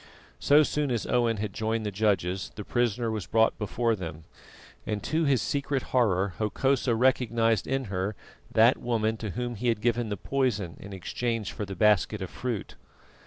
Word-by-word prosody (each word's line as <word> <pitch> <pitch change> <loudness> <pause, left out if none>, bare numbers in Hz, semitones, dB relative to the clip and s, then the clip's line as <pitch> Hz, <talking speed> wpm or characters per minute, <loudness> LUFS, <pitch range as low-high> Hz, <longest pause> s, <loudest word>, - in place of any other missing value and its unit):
So 150 +2 +5
soon 150 -1 -1
as 120 -3 -1
Owen 120 -2 +1
had 100 -1 -3
joined 110 +1 -1
the 105 - -2
judges, 95 -3 0
the 105 - -6
prisoner 120 -1 0
was 105 -6 -4
brought 110 +4 +2
before 115 +2 0
them, 80 -5 -7 0.6
and 105 -1 -3
to 160 +1 0
his 135 -4 +2
secret 140 -2 -1
horror 100 -6 +2
Hokosa 125 +3 +1
recognised 115 -3 +2
in 135 0 0
her 100 -1 -3 0.4
that 115 +3 +5
woman 110 -2 0
to 110 -1 -5
whom 120 0 -2
he 120 +2 -3
had 115 -3 +2
given 120 0 0
the 100 - -3
poison 105 -9 -1
in 100 - -10
exchange 110 +2 -3
for 105 - -4
the 95 0 -7
basket 105 +1 +3
of 95 -2 -6
fruit. 120 -5 -4
110 Hz, 175 wpm, -28 LUFS, 100-120 Hz, 0.6 s, So